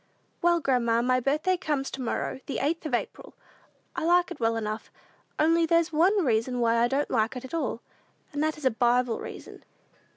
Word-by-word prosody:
"Well, 345 0 +3
grandma, 235 -4 +2
my 255 +1 +2
birthday 305 +8 +1
comes 295 -6 -2
to 270 - -6
morrow, 250 +1 -3
the 275 - -3
8th 315 +3 -1
of 260 - +1
April. - - -6 0.6
I 350 - -3
like 350 +2 +3
it 350 - -7
well 230 -1 +1
enough; 215 0 -4 0.5
only 330 +1 +3
there's 335 0 +2
one 365 +4 +3
reason 245 +1 0
why 230 -1 +2
I 235 - +4
don't 275 +3 -1
like 225 0 +1
it 250 - -6
at 260 - -11
all, 275 -7 -2 0.5
and 290 - -2
that 310 0 0
is 300 - -9
a 260 - +4
Bible 240 +1 +1
reason. - - -9
270 Hz, 195 wpm, -27 LUFS, 240-330 Hz, 0.6 s, I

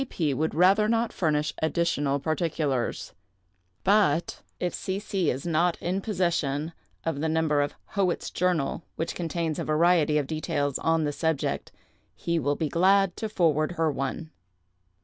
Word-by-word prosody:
P. 155 -5 0
would 155 +4 -1
rather 195 +5 +5
not 230 0 +1
furnish 150 -2 0
additional 160 -4 +1
particulars; 155 -4 -1 0.7
but 190 -6 +2 0.2
if 180 - -1
C. 190 0 -3
C. 195 -5 -1
is 130 +5 -3
not 170 +1 +1
in 185 +3 -2
possession 170 -7 -1 0.3
of 160 -3 -1
the 160 +2 0
number 155 -2 +2
of 145 - -2
'Howitt's 190 -4 -1
Journal,' 175 -4 0
which 165 - -3
contains 165 -2 -2
a - - -1
variety 155 -1 +3
of 145 - +1
details 145 -2 -2
on 165 -1 +1
the 145 - 0
subject, 160 -1 -1 0.4
he 170 -1 -1
will 145 0 0
be 160 - -1
glad 190 +3 +3
to 220 - -3
forward 160 -5 +1
her 160 -2 +1
one. 135 +4 -4
160 Hz, 150 wpm, -27 LUFS, 150-180 Hz, 0.7 s, rather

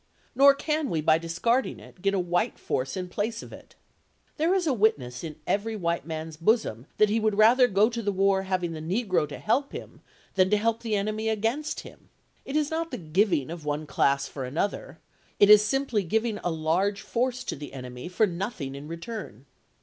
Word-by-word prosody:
Nor 275 +2 +7
can 305 -1 -1
we, 160 - 0
by 155 +1 +3
discarding 170 +10 0
it, 180 - -16
get 195 +1 +1
a - - +1
white 175 0 0
force 130 +7 -2
in 185 -1 -3
place 220 +5 -3
of - - -11
it. - - -14 0.6
There 330 +4 +2
is 370 -2 +1
a 295 - +2
witness 140 - 0
in 155 -2 -6
every 220 +2 -1
white 170 -5 -2
man's 160 -1 -5
bosom 165 - +1
that 215 -1 +4
he 225 - +2
would 215 -2 0
rather 240 +4 +6
go 205 0 +4
to 235 0 -3
the 205 -2 0
war 195 0 +2
having 185 -3 -1
the 160 - -6
negro 180 -3 0
to - - -7
help 275 +6 0
him - - -9 0.3
than 185 -1 +3
to 210 - +4
help 230 +2 0
the 225 -2 -1
enemy 215 +2 -1
against 225 +8 -1
him. - - -15 0.4
It 275 - -5
is 305 -1 +1
not 330 +1 -2
the - - -5
giving 165 -3 +1
of 170 -2 -7
one 150 +1 -2
class 140 -1 +1
for 135 - -6
another 185 - -3 0.2
— - - -35
it 205 +1 +7
is 210 0 +9
simply 250 -1 0
giving 220 +4 -1
a 175 - 0
large 175 +5 0
force 250 +3 -1
to - - -4
the 145 -1 -8
enemy 125 +1 -8
for 180 +5 +2
nothing 180 - -4
in 140 +2 -8
return. 170 - -7
200 Hz, 210 wpm, -27 LUFS, 160-225 Hz, 0.6 s, is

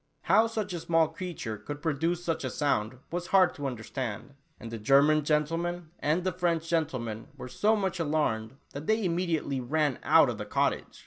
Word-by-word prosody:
How 215 +6 +4
such 215 -4 -3
a 175 - -3
small 165 -1 +2
creature 160 -10 -5
could 145 +6 -7
produce 165 +3 -1
such 165 -4 -2
a 130 - -1
sound, 125 -4 0
was 175 +1 -3
hard 185 -2 +4
to 145 -2 -4
understand, 125 0 -5 0.3
and 115 -2 -8
the 115 - -5
German 140 +7 +4
gentleman 165 +3 -1
and 160 +4 +1
the 185 - 0
French 170 -2 -1
gentleman, 130 -10 -2
were - - -7
so 215 - +2
much 190 -3 -1
alarmed, 135 -7 -1
that 145 +2 -7
they 220 -1 +2
immediately 170 -6 0
ran 145 +1 0
out - - +6
of - - -3
the - - -4
cottage - - -1
155 Hz, 185 wpm, -29 LUFS, 135-175 Hz, 0.3 s, out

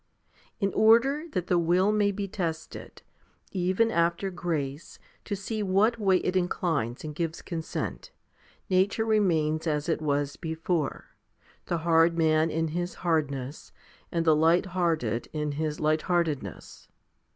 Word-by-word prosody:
In 195 -2 0
order 255 +8 +4
that 180 -2 -1
the 180 -1 +2
will 180 +4 +3
may 210 -1 +2
be 200 0 -4
tested, 165 -4 -5 0.5
even 190 +5 +1
after 170 +2 +1
grace, 155 -4 -4 0.3
to 205 - -2
see 215 +2 -4
what 210 +4 +2
way 195 -3 +4
it 180 - -1
inclines 170 -9 -1
and 155 -1 -5
gives 165 +1 -3
consent, 165 -3 -5 0.6
nature 195 +4 +2
remains 165 -8 +1
as 150 -1 -1
it 160 - 0
was 145 -1 -1
before, 160 -1 -2 0.6
the 170 - 0
hard 165 0 +4
man 160 0 +3
in 160 +1 -1
his 175 +3 -3
hardness, 145 -4 -1 0.4
and 165 -1 0
the 160 -2 +5
light 165 +4 +3
hearted 155 - 0
in 150 -1 -2
his 150 +1 -3
light 155 0 +2
heartedness. 155 - -3
170 Hz, 140 wpm, -27 LUFS, 155-190 Hz, 0.6 s, the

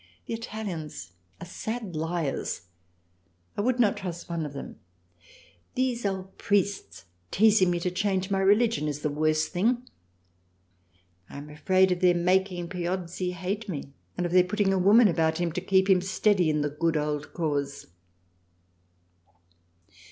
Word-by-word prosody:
The - - -5
Italians 180 - -6 0.3
are - - -7
sad 215 +1 -5
Liars, 160 - -2 0.9
I - - -1
would 250 +3 +1
not 215 -4 +3
trust 175 -3 -6
one 165 -2 -2
of 145 - -10
them. 140 - -8 1.0
These 250 -4 0
old 190 -1 -5
priests 200 0 -1 0.3
teizing 210 -1 +5
me 175 -1 +1
to 180 - -1
change 190 +1 -1
my 195 - +2
religion 205 -2 +3
is 145 0 -3
the 150 - -1
worse 155 +1 +1
thing. 240 +7 0 1.4
I - - -9
am 145 +1 -9
afraid 185 +5 +3
of 180 - 0
their 180 -1 +4
making 180 0 +1
Piozzi 180 0 -3
hate 195 +5 -4
me, 140 -5 -6 0.2
and 180 - 0
of 175 - -2
their 180 0 +6
putting 195 +1 +1
a 190 - +1
Woman 210 +5 +6
about 160 -3 +1
him 175 -1 -1
to 180 - -3
keep 190 0 +3
him 190 -2 +5
steady 190 -2 +2
in 150 -1 +1
the 145 0 -1
Good 165 +2 0
Old 150 0 -2
Cause. 145 -4 -2
180 Hz, 150 wpm, -27 LUFS, 160-200 Hz, 1.4 s, their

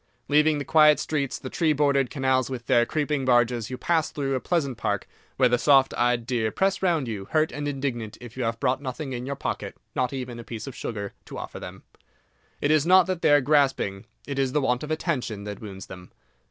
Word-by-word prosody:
Leaving 150 +1 +4
the 145 - -4
quiet 150 0 +6
streets, 140 -4 -2
the - - -8
tree 155 +3 +1
bordered 140 -3 +2
canals, 130 -2 +1
with 125 -3 -6
their 120 0 +3
creeping 150 -2 -1
barges, 120 -2 +2
you 130 - -5
pass 165 +1 +1
through 135 -2 -2
a 130 - 0
pleasant 140 -4 -1
park, - - -2 0.3
where 130 - +5
the 125 0 +2
soft 135 -1 +4
eyed 120 -1 +1
deer 120 -3 0
press 195 0 0
round 170 -8 +1
you, 105 -4 -4
hurt 155 +6 +1
and 145 0 -4
indignant 130 -6 -3
if 120 -1 -11
you 130 - -3
have 115 0 -2
brought 130 0 0
nothing 135 +1 -5
in 125 +1 -5
your 140 - -2
pocket—not 130 -2 -4
even 125 -3 -5
a - - -7
piece 110 -1 -7
of 135 - -7
sugar—to 100 -4 -6
offer - - -7
them. - - -9 0.8
It 145 - +2
is 155 -2 +4
not 185 0 +7
that 185 -1 -3
they - - +3
are 145 0 +6
grasping—it 135 -2 0
is 130 -1 0
the 150 - +2
want 125 -2 +1
of 150 - -6
attention 135 - -2
that 105 -1 -7
wounds 100 -3 -8
them. 90 -1 -11
135 Hz, 215 wpm, -25 LUFS, 120-150 Hz, 0.8 s, not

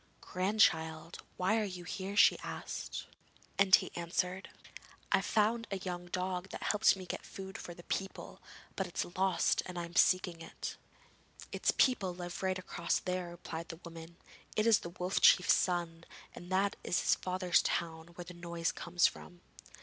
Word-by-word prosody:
'Grandchild, 165 -4 +1 0.2
why 195 +5 +2
are - - 0
you 180 -3 -5
here?' 190 +3 -5
she - - +6
asked, - - -5 0.5
and 195 -1 +8
he - - -3
answered: 180 +2 -2 0.6
'I 195 - +4
found 220 +3 +1
a 195 - -2
young 180 -2 -5
dog 185 +1 -2
who - - -4
helped 210 0 +3
me 190 -1 -8
to - - -20
get - - -4
food 190 0 -9
for 175 - -7
the 175 - -13
people, 195 +2 -5 0.3
but - - -1
it - - -13
is 175 - -2
lost 190 0 +2
and 180 -1 -7
I 170 - -2
am 170 +1 -12
seeking 185 -2 +3
it.' 165 - -6 0.8
'Its - - 0
people 195 -9 +3
live 175 -1 -6
right 190 -1 0
across 180 -2 -1
there,' 180 -1 -3
replied 170 -1 -7
the 165 - -8
woman. 165 0 -10 0.4
'It 215 - +2
is 230 -2 +6
the 170 - -7
Wolf 180 +2 -2
Chief's 180 - +7
son, 170 -2 0 0.3
and 175 +1 -10
that 195 +2 +1
is 175 - +1
his - - +4
father's 185 -1 +2
town 160 -1 -2
where 175 - -7
the 180 - -9
noise 170 -1 -2
comes 175 0 +1
from.' 175 -1 -3
180 Hz, 180 wpm, -33 LUFS, 170-190 Hz, 0.8 s, and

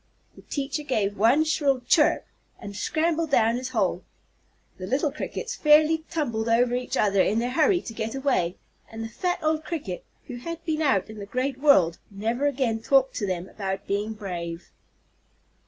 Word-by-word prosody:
The - - -14
teacher 280 +1 -3
gave 215 -8 -1
one 235 +10 +4
shrill 285 -4 +1
"chirp," 300 +5 +3 0.3
and 200 0 -8
scrambled 320 - 0
down 230 -4 +3
his 255 +1 -4
hole. 195 -7 0 0.8
The 185 - -5
little 280 +6 +1
Crickets 300 - -5
fairly 310 +1 +4
tumbled 235 -9 -2
over 240 +1 +3
each 250 0 -2
other 200 -2 +3
in 215 - +1
their 240 +2 0
hurry 335 +6 +3
to 225 - -8
get 220 +2 -4
away, 255 -11 0 0.4
and 225 0 -6
the 225 - -5
fat 355 - -1
old 310 0 +1
Cricket, 280 - -5 0.2
who 245 - -7
had 335 +6 -7
been 315 -1 -1
out 220 -9 +1
in 215 - -10
the 200 - -7
great 255 +4 -2
world, 190 - +4
never 225 +7 -1
again 250 -5 0
talked 270 +2 +3
to 205 - -1
them 185 -1 -3
about 195 -1 -4
being 205 +2 -2
brave. 175 -5 -6
245 Hz, 175 wpm, -25 LUFS, 205-300 Hz, 0.8 s, one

